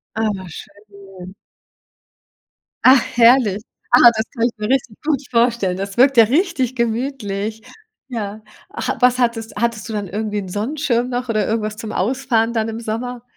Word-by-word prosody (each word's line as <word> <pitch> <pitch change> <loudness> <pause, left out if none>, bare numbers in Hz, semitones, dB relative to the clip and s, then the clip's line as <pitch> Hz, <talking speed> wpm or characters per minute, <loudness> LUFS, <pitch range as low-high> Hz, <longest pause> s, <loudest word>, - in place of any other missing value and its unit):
Ah, 220 0 0 0.2
schön. 200 0 -12 1.5
Ach, 260 0 +7 0.2
herrlich. 230 -4 +5 0.3
Ah, 245 0 +8
das 220 - 0
kann 235 -2 0
ich 245 - +1
mir 210 +2 -4
richtig 245 -5 0
gut 290 -4 +1
vorstellen. 230 -6 +1
Das 195 +2 -6
wirkt 270 +2 +5
ja 230 - +9
richtig 265 - 0
gemütlich. 225 -3 -3 0.5
Ja. 215 -4 -5 0.3
Ach, 425 - -3
was 250 0 +4
hattest 230 -2 -1
hattest 230 0 -2
du 220 - -5
dann 205 -2 -3
irgendwie 210 +2 -3
'n 190 - -6
Sonnenschirm 245 +3 -1
noch 245 0 -3
oder 215 -3 +1
irgendwas 215 -1 -2
zum 220 -1 -6
Ausfahren 235 +2 0
dann 225 -1 -1
im 225 - -5
Sommer? 235 +2 -5
230 Hz, 155 wpm, -19 LUFS, 210-245 Hz, 1.5 s, ja